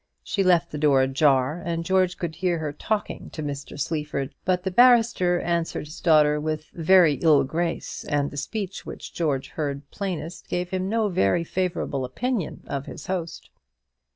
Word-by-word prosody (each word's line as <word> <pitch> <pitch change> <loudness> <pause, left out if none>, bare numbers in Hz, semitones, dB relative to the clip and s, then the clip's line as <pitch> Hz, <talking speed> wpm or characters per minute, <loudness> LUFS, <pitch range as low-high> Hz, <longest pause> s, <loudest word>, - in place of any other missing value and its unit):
She 200 - -1
left 175 -2 +3
the 150 - -4
door 140 -3 +4
ajar, 135 +3 +2
and 165 -1 -2
George 185 0 +2
could 165 -2 -4
hear 180 -1 0
her 155 -2 -3
talking 215 +7 -3
to 155 - -5
Mr. 140 0 -6
Sleaford; 150 -1 -2
but 180 0 +1
the 190 - -1
barrister 225 -6 +5
answered 170 -2 -1
his 155 +2 -10
daughter 150 -2 +4
with 155 0 -3
a 170 - -8
very 175 -2 +6
ill 150 -4 +5
grace, 165 +5 -3
and 145 -1 0
the 145 - -9
speech 195 +6 -4
which - - -9
George 140 -5 -1
heard 140 -2 -4
plainest 180 -4 -5
gave 180 0 -2
him 185 0 -1
no 225 0 +1
very 130 - +2
favourable 170 -6 -2
impression 205 - -3
of 140 0 -4
his - - -8
host. 175 -3 -4
165 Hz, 175 wpm, -25 LUFS, 145-185 Hz, -, very